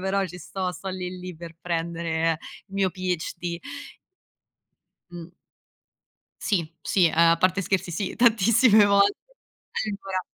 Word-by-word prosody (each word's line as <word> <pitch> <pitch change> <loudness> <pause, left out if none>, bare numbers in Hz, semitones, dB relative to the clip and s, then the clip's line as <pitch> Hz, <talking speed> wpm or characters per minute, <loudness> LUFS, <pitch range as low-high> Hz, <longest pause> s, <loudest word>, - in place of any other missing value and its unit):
però 195 +1 0
ci 180 0 -10
sto. 185 +2 -4
Sto 190 +3 -7
lì 185 -1 -5
lì 180 -1 -7
per 165 0 -10
prendere 165 -1 -1 0.3
il 195 - -14
mio 195 -1 +1
PhD. 175 -1 -3 1.5
Mh. 175 -1 -9 1.1
Sì, 170 -6 -1
sì, 175 -4 +3
a 165 +1 +5
parte 185 +3 +2
scherzi 185 -1 -1
sì, 185 +3 -3
tantissime 225 -1 +5
volte. 200 0 +4 0.8
Allora 195 -2 -3
185 Hz, 120 wpm, -25 LUFS, 170-195 Hz, 1.5 s, a